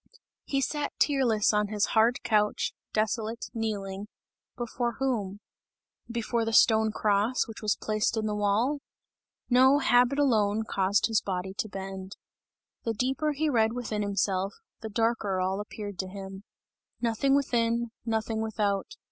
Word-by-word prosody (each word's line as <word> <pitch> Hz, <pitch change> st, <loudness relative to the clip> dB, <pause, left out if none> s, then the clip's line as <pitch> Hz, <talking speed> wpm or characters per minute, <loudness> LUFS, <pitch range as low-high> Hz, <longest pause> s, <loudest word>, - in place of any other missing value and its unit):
He 275 Hz, -1 st, 0 dB
sat 295 Hz, +1 st, -2 dB
tearless 245 Hz, -8 st, +3 dB
on 210 Hz, 0 st, +2 dB
his 210 Hz, 0 st, 0 dB
hard 230 Hz, +2 st, +3 dB
couch, 210 Hz, -1 st, +1 dB, 0.2 s
desolate, 220 Hz, +1 st, -1 dB
kneeling 205 Hz, -3 st, -3 dB, 0.5 s
before 240 Hz, 0 st, -2 dB
whom? 215 Hz, -7 st, -2 dB, 0.7 s
Before 235 Hz, 0 st, -1 dB
the 225 Hz, -, -1 dB
stone 220 Hz, 0 st, +5 dB
cross 210 Hz, +4 st, +1 dB
which 225 Hz, -, -9 dB
was 215 Hz, -1 st, +1 dB
placed 215 Hz, +2 st, -1 dB
in 220 Hz, -, 0 dB
the 210 Hz, -, -1 dB
wall? 210 Hz, +8 st, +1 dB, 0.7 s
No, 260 Hz, +3 st, +6 dB
habit 250 Hz, -1 st, +3 dB
alone 220 Hz, -6 st, +2 dB
caused 195 Hz, -2 st, +1 dB
his 225 Hz, -2 st, +2 dB
body 190 Hz, 0 st, -3 dB
to 215 Hz, -, -3 dB
bend. 190 Hz, 0 st, -7 dB, 0.7 s
The 230 Hz, -, -1 dB
deeper 270 Hz, +6 st, 0 dB
he 310 Hz, +2 st, 0 dB
read 225 Hz, -5 st, +2 dB
within 230 Hz, -4 st, -3 dB
himself, 195 Hz, -1 st, 0 dB, 0.2 s
the 220 Hz, -, -6 dB
darker 220 Hz, -3 st, 0 dB
all 190 Hz, +2 st, 0 dB
appeared 205 Hz, -2 st, -7 dB
to 190 Hz, -, -2 dB
him. 195 Hz, +1 st, -8 dB, 0.5 s
"Nothing 240 Hz, +4 st, +2 dB
within, 235 Hz, -4 st, +1 dB
nothing 220 Hz, -1 st, -1 dB
without! 205 Hz, -3 st, -1 dB
220 Hz, 140 wpm, -28 LUFS, 205-240 Hz, 0.7 s, No